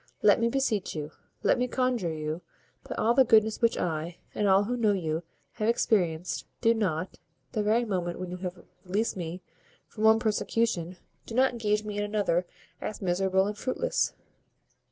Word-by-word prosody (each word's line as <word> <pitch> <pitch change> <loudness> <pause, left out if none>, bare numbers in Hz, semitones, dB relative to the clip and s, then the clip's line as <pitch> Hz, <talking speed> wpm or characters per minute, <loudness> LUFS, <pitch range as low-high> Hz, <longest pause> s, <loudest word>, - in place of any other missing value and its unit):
Let - - +6
me 230 0 +2
beseech 230 -9 0
you, 150 0 -4 0.3
let - - +3
me 250 - +1
conjure 250 -9 0
you, 155 +1 -4 0.5
by - - -3
all 230 +2 +3
the 265 - +6
goodness 220 -2 +4
which 230 -1 +3
I, 165 0 -2 0.2
and 205 - 0
all 195 +1 +5
who 240 +4 -2
know 220 -4 +3
you, 160 -4 -1 0.3
have 215 - -2
experienced, 175 -8 +1
do 230 -1 +4
not, 185 -6 -2 0.3
the 215 - 0
very 220 +3 +2
moment 180 -5 -2
when 180 -1 -5
you 180 - -4
have 180 0 -5 0.3
released 205 +5 -1
me 175 0 -5 0.4
from 215 - -6
one 220 0 +7
persecution, 215 -5 0 0.3
do 225 - -6
not 260 +1 +4
engage 210 -3 0
me 210 -1 -4
in - - 0
another 205 -4 0 0.3
as 215 - -4
miserable 190 0 +2
and 210 +1 -3
as 210 - -11
fruitless." 475 - 0
205 Hz, 180 wpm, -28 LUFS, 180-225 Hz, 0.5 s, one